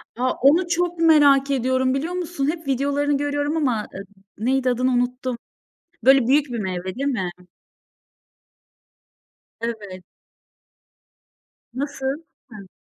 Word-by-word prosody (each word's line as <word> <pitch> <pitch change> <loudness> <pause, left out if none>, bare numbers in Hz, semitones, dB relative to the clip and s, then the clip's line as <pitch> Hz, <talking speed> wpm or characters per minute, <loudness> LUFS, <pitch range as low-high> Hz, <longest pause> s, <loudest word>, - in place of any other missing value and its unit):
A! 255 +2 0
Onu 315 +7 +4
çok 350 0 -1
merak 285 -4 +5
ediyorum 260 0 +1
biliyor 310 +6 -2
musun? 350 -6 -2
Hep 325 -3 -9
videolarını 285 +2 +1
görüyorum 290 +2 -1
ama, 245 -9 0
ııı, 195 - -7 0.3
neydi 255 +3 +1
adını 250 +1 +1
unuttum. 250 0 -1 0.7
Böyle 270 -2 +6
büyük 285 +3 +3
bir 245 -3 -5
meyve 185 -3 -3
değil 275 +5 -3
mi? 200 -10 -1 2.3
Evet. 205 -6 -5 1.7
Nasıl? 275 +2 -3 0.3
Hı. 205 -5 -11
270 Hz, 110 wpm, -22 LUFS, 245-290 Hz, 2.3 s, Böyle